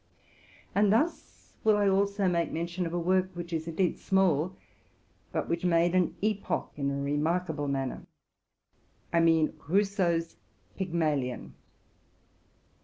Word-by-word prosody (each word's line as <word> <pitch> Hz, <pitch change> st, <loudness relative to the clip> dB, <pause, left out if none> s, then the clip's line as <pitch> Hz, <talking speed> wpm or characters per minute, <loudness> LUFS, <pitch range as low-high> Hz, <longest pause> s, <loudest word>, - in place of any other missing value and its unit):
And 200 Hz, 0 st, +4 dB
thus 295 Hz, +11 st, -1 dB
will 215 Hz, -1 st, +4 dB
I 205 Hz, -1 st, +3 dB
also 200 Hz, 0 st, +2 dB
make 170 Hz, -2 st, +1 dB
mention 170 Hz, +2 st, -2 dB
of 165 Hz, -, -6 dB
a -, -, +1 dB
work, 185 Hz, +2 st, +2 dB
which 175 Hz, 0 st, -6 dB
is 160 Hz, 0 st, -2 dB
indeed 170 Hz, +2 st, 0 dB
small, 185 Hz, -3 st, +2 dB, 0.8 s
but -, -, -2 dB
which 170 Hz, +1 st, -2 dB
made 170 Hz, 0 st, +3 dB
an 180 Hz, -2 st, +2 dB
epoch 210 Hz, -1 st, -1 dB
in 140 Hz, -1 st, -1 dB
a 140 Hz, 0 st, -2 dB
remarkable 150 Hz, +2 st, -1 dB
man 135 Hz, -1 st, -1 dB
ner, -, -, -10 dB, 0.5 s
— -, -, -38 dB
I 170 Hz, -, +4 dB
mean 165 Hz, -1 st, +3 dB
Rousseau's 180 Hz, -3 st, +1 dB, 0.4 s
Pygmalion. 155 Hz, -9 st, -1 dB
170 Hz, 135 wpm, -29 LUFS, 160-190 Hz, 0.8 s, And